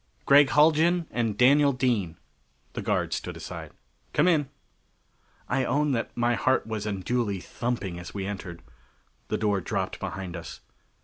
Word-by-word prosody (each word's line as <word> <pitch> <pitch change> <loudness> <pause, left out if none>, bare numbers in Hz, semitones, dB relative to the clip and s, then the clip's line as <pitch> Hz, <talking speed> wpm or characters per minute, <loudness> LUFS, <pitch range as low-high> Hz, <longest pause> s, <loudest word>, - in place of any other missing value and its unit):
"Gregg 140 0 +6
Haljan 160 +3 +4
and 115 -4 -1
Daniel 140 +3 +5
Dean." 115 -10 0 0.6
The - - -4
guard - - 0
stood - - -4
aside. - - -7 0.4
"Come 150 - +3
in." 150 -6 +2 1.0
I 135 +1 +1
own 150 +2 +1
that 115 -3 -1
my 120 0 +2
heart 130 +2 +1
was 110 -1 -4
unduly 105 +1 -1
thumping 100 -4 -4
as 90 - -8
we 100 -2 -4
entered. 95 -4 -6 0.6
The - - -1
door 105 -3 +1
dropped - - -3
behind 95 -2 -5
us. 85 - -8
120 Hz, 145 wpm, -27 LUFS, 100-140 Hz, 1.0 s, Gregg